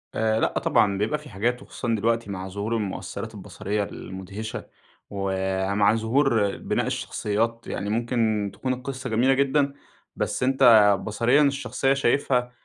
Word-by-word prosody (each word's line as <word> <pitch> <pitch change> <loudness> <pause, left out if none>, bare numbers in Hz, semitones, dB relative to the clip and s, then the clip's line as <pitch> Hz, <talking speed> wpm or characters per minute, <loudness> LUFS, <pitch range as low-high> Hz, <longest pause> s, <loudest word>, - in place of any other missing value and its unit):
آآ، 110 0 +1
لأ - - 0
طبعًا 100 -2 +2
بيبقى 110 +10 0
في 150 -2 -13
حاجات 120 +5 -1
وخصوصًا 120 -4 -3
دلوقتي 115 0 0
مع 95 -1 -5
ظهور 100 +4 -3
المؤثرات 105 -4 -4
البصرية 105 +1 -3
المدهشة، 100 +3 -7 0.4
ومع 95 +1 +1
ظهور 115 -2 +1
بناء - - -1
الشخصيات 115 +3 -2
يعني 100 - -3
ممكن 110 -2 0
تكون 130 -1 -2
القصّة 130 0 -5
جميلة 125 +4 +3
جدًا، 140 +1 +2 0.4
بس - - -2
أنت 135 +1 +2 0.4
بصريًا 120 +7 +2
الشخصية 135 -2 +1
شايفها 125 -2 +1
115 Hz, 135 wpm, -25 LUFS, 100-130 Hz, 0.4 s, جميلة